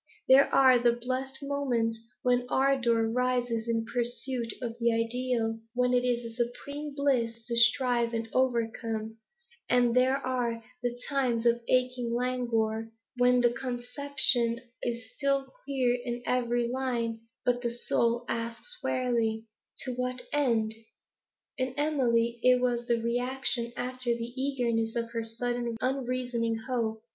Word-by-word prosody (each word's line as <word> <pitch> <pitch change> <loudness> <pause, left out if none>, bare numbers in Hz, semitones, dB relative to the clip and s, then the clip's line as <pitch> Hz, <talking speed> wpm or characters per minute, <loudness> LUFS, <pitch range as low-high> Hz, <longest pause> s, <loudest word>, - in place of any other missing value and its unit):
There 270 +2 +7
are 260 -2 +6
the 240 0 +4
blessed 255 +3 -4
moments 245 -5 0 0.2
when 245 0 +2
ardour 245 -4 +2
rises 245 -1 0
in 230 -1 0
pursuit 240 0 -2
of 235 -3 -4
the 235 0 +3
ideal, 230 0 0 0.2
when 250 0 +2
it 250 0 +3
is 240 -2 -1
supreme 285 +5 -4
bliss 235 -5 0
to 235 0 -2
strive 235 0 +4
and 225 0 -2
overcome; 225 -3 -1 0.5
and 245 -1 +4
there 260 +2 +4
are 245 -4 -2 0.2
the 245 0 -2
times 250 -5 0
of 235 0 +3
aching 250 -2 +1
languor, 230 -3 0 0.3
when 250 0 +4
the 240 -1 +4
conception 245 -1 0 0.2
is 235 -2 -4
still 275 -1 +1 0.2
clear 255 -3 +1
in 240 0 -4
every 240 -1 +1
line, 240 -3 -1 0.3
but 245 0 +2
the 235 -1 -1
soul 235 0 0
asks 230 - -3
wearily 230 -3 0 0.4
To 255 - -2
what 250 0 -3
end? 230 -7 +2 0.9
In 255 0 -1
Emily 235 -6 +1
it 250 0 +5
was 240 -1 0
reaction 240 +1 0
after 250 -1 -1
the 235 +1 -5
eagerness 235 -5 0
of 230 0 -2
her 230 -1 -2
sudden 240 +1 -2
unreasoning 250 -3 -1
hope. 225 -3 -1
245 Hz, 135 wpm, -29 LUFS, 230-255 Hz, 0.9 s, There